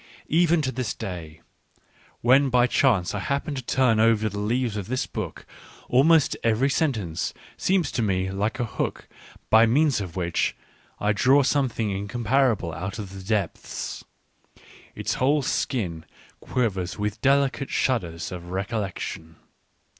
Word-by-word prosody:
Even 165 0 +3
to 130 - 0
this 125 -2 -3
day, 85 -6 -7 0.8
when 135 +3 +5
by 125 -1 +4
chance 120 -8 +2
I - - -2
happen 140 +2 -2
to 135 - -4
turn 120 -2 +2
over 110 -1 +3
the 100 0 -5
leaves 115 +2 0
of 100 -3 -4
this 130 +1 -1
book, - - -6 0.4
almost 150 +4 +4
every 115 +5 +2
sentence 110 - -1 0.2
seems 185 -3 +1
to - - -1
me 95 -3 0
like 100 +3 -2
a 120 - +1
hook 110 - -4 0.4
by 110 +1 +7
means 140 0 +3
of 90 -4 -7
which 85 -2 0 0.4
I 105 +1 +2
draw 135 +7 +4
something 125 -6 0
incomparable 110 -1 0
out 95 +5 -5
of 100 -3 -7
the 95 - -8
depths; 100 -3 -3 0.9
its - - -2
whole 140 +3 +2
skin 90 - -2 0.3
quivers 95 -8 -2
with 105 0 -3
delicate 140 0 +2
shudders 85 -11 -1
of 90 -1 -7
recollection. 95 -4 -4
110 Hz, 140 wpm, -25 LUFS, 95-130 Hz, 0.9 s, by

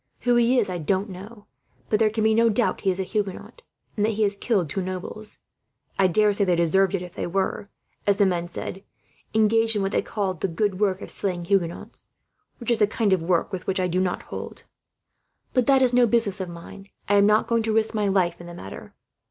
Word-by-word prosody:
Who 245 -1 +2
he 240 +2 +3
is 235 - +2
I 180 -2 -4
don't 190 +5 -1
know, 205 +4 -11 0.4
but 210 - +1
there 220 -1 +4
can 220 0 -2
be 220 0 +4
no 230 +1 +4
doubt 225 +2 0
he 195 - +1
is 185 0 -1
a - - 0
Huguenot, 205 - -4 0.3
and 205 - 0
that 220 +1 +1
he 215 +1 0
has 200 -1 +1
killed 200 -5 0
two 190 +7 -3
nobles. 185 +3 -6 0.6
I 190 - +5
daresay 205 +2 +2
they 180 -3 +2
deserved 180 +3 +2
it 180 - -3
if 180 -1 -10
they - - -4
were, 195 +2 -2 0.4
as 200 -1 +3
the 200 - +4
men 175 -2 0
said, 185 +2 -7 0.5
engaged 225 +1 +3
in 205 - 0
what 195 - -1
they - - +1
call 200 -3 -2
the 180 +2 -3
good 190 +2 -1
work 195 -2 0
of - - -8
slaying 180 -3 -3
Huguenots; 175 -3 -2 0.5
which 240 -1 -3
is 230 -2 +2
a 210 - +5
kind 215 -2 +1
of 185 - +1
work 170 +3 0
with 185 - -5
which 190 0 0
I 185 - +1
do 180 0 0
not 185 -1 -1
hold. - - -8 0.9
But 255 -3 +2
that 270 -1 +5
is 250 -1 +2
no 245 -1 +5
business 220 -4 +1
of 185 - -4
mine 170 +3 -11 0.2
I 205 - +1
am 200 0 +5
not 210 +1 +4
going 230 0 +1
to 220 0 -1
risk 220 +1 +1
my 210 -2 0
life 180 -3 +1
in 175 - -10
the 175 - -9
matter. 95 - -10
200 Hz, 235 wpm, -24 LUFS, 185-220 Hz, 0.9 s, I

